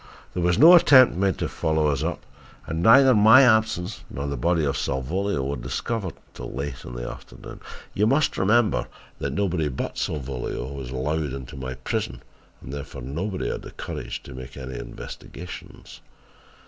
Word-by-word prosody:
There 90 Hz, -, -2 dB
was 85 Hz, 0 st, +2 dB
no 165 Hz, +4 st, +9 dB
attempt 130 Hz, -, +7 dB
made 95 Hz, 0 st, +1 dB
to -, -, -2 dB
follow 80 Hz, -1 st, 0 dB
us 70 Hz, -3 st, +1 dB
up -, -, -3 dB, 0.4 s
and 80 Hz, 0 st, -3 dB
neither 130 Hz, +6 st, +7 dB
my 110 Hz, +5 st, +7 dB
absence 110 Hz, -5 st, +2 dB
nor 70 Hz, +3 st, -5 dB
the 70 Hz, 0 st, -2 dB
body 85 Hz, -1 st, +1 dB
of 70 Hz, 0 st, 0 dB
Salvolio 70 Hz, +6 st, -1 dB
were 70 Hz, +2 st, -2 dB
discovered 110 Hz, -7 st, -3 dB
until -, -, -8 dB
late 70 Hz, 0 st, -5 dB
in 60 Hz, -, -9 dB
the -, -, -5 dB
afternoon. -, -, -10 dB, 0.3 s
You 105 Hz, +2 st, +2 dB
must 140 Hz, +5 st, +2 dB
remember 105 Hz, +1 st, +2 dB, 0.3 s
that 70 Hz, -, -2 dB
nobody 85 Hz, -1 st, 0 dB
but 65 Hz, -, -4 dB
Salvolio 65 Hz, -2 st, -4 dB
was 65 Hz, -3 st, -7 dB
allowed 70 Hz, +2 st, -2 dB
into 65 Hz, -2 st, -8 dB
my 65 Hz, -1 st, -5 dB
prison 65 Hz, -, -4 dB, 0.4 s
and 65 Hz, -, -8 dB
therefore 70 Hz, -3 st, -7 dB
nobody 90 Hz, -, -3 dB
had -, -, -5 dB
the -, -, -10 dB
courage -, -, -6 dB
to -, -, -10 dB
make 65 Hz, +2 st, -9 dB
any 65 Hz, -2 st, -6 dB
investigations. 90 Hz, +7 st, -10 dB
80 Hz, 170 wpm, -24 LUFS, 65-100 Hz, 0.4 s, no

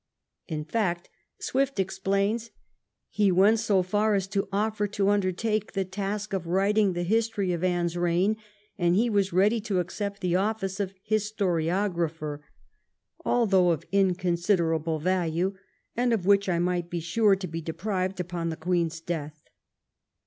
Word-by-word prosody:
In 155 Hz, -3 st, -4 dB
fact, 175 Hz, -2 st, -1 dB, 0.3 s
Swift 270 Hz, -3 st, -1 dB
explains, 195 Hz, +4 st, 0 dB, 0.6 s
he 205 Hz, -3 st, +2 dB
went 200 Hz, +5 st, +5 dB
so 200 Hz, -4 st, +2 dB
far 210 Hz, +3 st, +1 dB
as 195 Hz, -2 st, 0 dB
to 195 Hz, -1 st, -1 dB
offer 210 Hz, +1 st, 0 dB
to 200 Hz, -1 st, 0 dB
undertake 205 Hz, +2 st, 0 dB
the 195 Hz, -1 st, -1 dB
task 200 Hz, +2 st, -4 dB
of 180 Hz, -3 st, -2 dB
writing 195 Hz, +2 st, +2 dB
the 175 Hz, 0 st, -2 dB
history 210 Hz, -1 st, 0 dB
of 170 Hz, 0 st, -3 dB
Anne's 175 Hz, -2 st, 0 dB
reign, 175 Hz, +5 st, +1 dB, 0.4 s
and 175 Hz, 0 st, +3 dB
he 230 Hz, +4 st, +2 dB
was 200 Hz, -2 st, +1 dB
ready 205 Hz, +6 st, +3 dB
to 205 Hz, -3 st, -1 dB
accept 200 Hz, +3 st, -4 dB
the 180 Hz, -2 st, +1 dB
office 195 Hz, 0 st, -1 dB
of 195 Hz, -2 st, -1 dB, 0.2 s
historiographer, 175 Hz, -6 st, -1 dB, 0.4 s
" -, -, -31 dB
although 195 Hz, -7 st, +3 dB
of 165 Hz, -4 st, 0 dB
inconsiderable 175 Hz, -4 st, +1 dB
value, 180 Hz, +2 st, 0 dB, 0.4 s
and 245 Hz, 0 st, +2 dB
of 200 Hz, -6 st, -1 dB
which 200 Hz, 0 st, +4 dB
I 175 Hz, -, +2 dB
might 175 Hz, 0 st, 0 dB
be 175 Hz, -, -3 dB
sure 195 Hz, +5 st, +3 dB
to 190 Hz, 0 st, -6 dB
be 165 Hz, 0 st, -5 dB
deprived 185 Hz, +3 st, -3 dB
upon 175 Hz, -1 st, -3 dB
the 160 Hz, -, -4 dB
Queen's 165 Hz, -1 st, -1 dB
death." 155 Hz, -3 st, -5 dB
190 Hz, 150 wpm, -27 LUFS, 175-205 Hz, 0.6 s, went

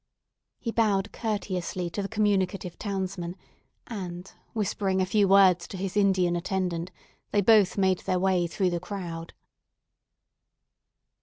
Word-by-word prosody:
He 230 Hz, -, -4 dB
bowed 210 Hz, -3 st, +1 dB
courteously 185 Hz, -5 st, -3 dB
to 205 Hz, -, -3 dB
the 195 Hz, -, -3 dB
communicative 195 Hz, -4 st, 0 dB
townsman, 190 Hz, -3 st, -3 dB, 0.5 s
and 185 Hz, -4 st, -7 dB, 0.2 s
whispering 200 Hz, -3 st, 0 dB
a 185 Hz, -, +2 dB
few 200 Hz, +2 st, +3 dB
words 190 Hz, -3 st, +5 dB
to 190 Hz, -, -7 dB
his 195 Hz, +1 st, -4 dB
Indian 190 Hz, -4 st, +3 dB
attendant, 180 Hz, -1 st, -2 dB, 0.4 s
they 205 Hz, -, +2 dB
both 210 Hz, -1 st, +5 dB
made 190 Hz, -2 st, +3 dB
their 185 Hz, -, -1 dB
way 180 Hz, -1 st, +2 dB
through 185 Hz, +1 st, 0 dB
the 175 Hz, -, -1 dB
crowd. 175 Hz, -3 st, -6 dB
190 Hz, 130 wpm, -27 LUFS, 180-200 Hz, 0.5 s, words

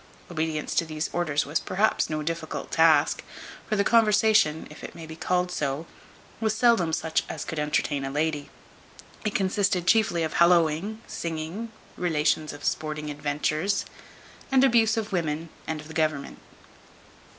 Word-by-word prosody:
Obedience 155 Hz, -2 st, -2 dB
to -, -, +2 dB
these 155 Hz, -1 st, -4 dB
orders 155 Hz, -4 st, 0 dB
was 150 Hz, +3 st, 0 dB
perhaps 205 Hz, +4 st, +1 dB
no 155 Hz, -1 st, -2 dB
difficult 165 Hz, 0 st, -4 dB
task; 160 Hz, -2 st, +4 dB, 0.5 s
for 215 Hz, -, +1 dB
the 200 Hz, -, +3 dB
conversation 215 Hz, -7 st, +4 dB
(if 150 Hz, -, -12 dB
it -, -, -8 dB
may 165 Hz, -, -8 dB
be 160 Hz, 0 st, -9 dB
called 180 Hz, +2 st, 0 dB
so) 145 Hz, -1 st, -2 dB, 0.5 s
was 220 Hz, -1 st, 0 dB
seldom 225 Hz, -8 st, +4 dB
such 160 Hz, 0 st, 0 dB
as -, -, -5 dB
could 160 Hz, -, -4 dB
entertain 150 Hz, -1 st, 0 dB
a 135 Hz, -, -3 dB
lady. 150 Hz, 0 st, -1 dB, 0.7 s
It 215 Hz, -1 st, -2 dB
consisted 190 Hz, -2 st, +1 dB
chiefly 195 Hz, -5 st, +3 dB
of 160 Hz, -, -2 dB
hallowing, 170 Hz, +5 st, +3 dB
singing, 170 Hz, +7 st, -5 dB, 0.3 s
relations 155 Hz, -3 st, +1 dB
of 145 Hz, 0 st, -9 dB
sporting 155 Hz, -1 st, -2 dB
adventures, 150 Hz, +5 st, -1 dB
b -, -, -16 dB
d -, -, -23 dB, 0.5 s
y, -, -, -21 dB
and 265 Hz, 0 st, +6 dB
abuse 230 Hz, -4 st, +4 dB
of 220 Hz, -1 st, -2 dB
women, 165 Hz, -3 st, -2 dB, 0.2 s
and 160 Hz, -1 st, -2 dB
of 150 Hz, -, -10 dB
the 160 Hz, -, -10 dB
government. 155 Hz, -3 st, -1 dB
160 Hz, 160 wpm, -26 LUFS, 155-200 Hz, 0.7 s, and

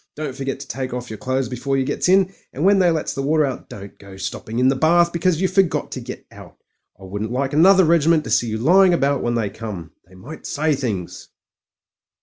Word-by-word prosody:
Don't 150 Hz, -3 st, -5 dB
forget 135 Hz, -1 st, -4 dB
to 140 Hz, -, -9 dB
take 130 Hz, -2 st, -4 dB
off 125 Hz, -2 st, -6 dB
yer 110 Hz, -, -6 dB
clothes 130 Hz, +2 st, -2 dB
before 135 Hz, +2 st, -2 dB
yer 135 Hz, -, 0 dB
gets 180 Hz, -, -1 dB
in; 190 Hz, 0 st, +3 dB, 0.2 s
and 150 Hz, +6 st, -2 dB
when 200 Hz, 0 st, +5 dB
they 180 Hz, -2 st, +4 dB
lets 160 Hz, -2 st, -1 dB
the 135 Hz, -, -4 dB
water 150 Hz, +2 st, +2 dB
out, 135 Hz, -2 st, -6 dB
don't 100 Hz, -1 st, -11 dB
go 100 Hz, -1 st, -13 dB
stopping 110 Hz, +3 st, -6 dB
in 125 Hz, +1 st, +3 dB
the 135 Hz, -, +3 dB
bath 170 Hz, +4 st, +3 dB
because 170 Hz, -1 st, +1 dB
you 190 Hz, -, +2 dB
forgot 190 Hz, -1 st, 0 dB
to -, -, -5 dB
get -, -, -9 dB
out. -, -, -14 dB, 0.4 s
I -, -, -15 dB
wouldn't 100 Hz, +4 st, -5 dB
like 135 Hz, +2 st, -2 dB
another 185 Hz, +4 st, +6 dB
regiment 165 Hz, -1 st, +3 dB
to -, -, -7 dB
see 120 Hz, -, +2 dB
you 110 Hz, 0 st, -3 dB
lying 180 Hz, -, +4 dB
about 140 Hz, -3 st, 0 dB
when 120 Hz, 0 st, -1 dB
they 110 Hz, -4 st, -1 dB
come. 100 Hz, -8 st, -8 dB, 0.2 s
They 95 Hz, -, -19 dB
might 130 Hz, +13 st, -10 dB
say 155 Hz, +1 st, 0 dB
things." 110 Hz, -10 st, -4 dB
135 Hz, 230 wpm, -20 LUFS, 120-165 Hz, 0.4 s, another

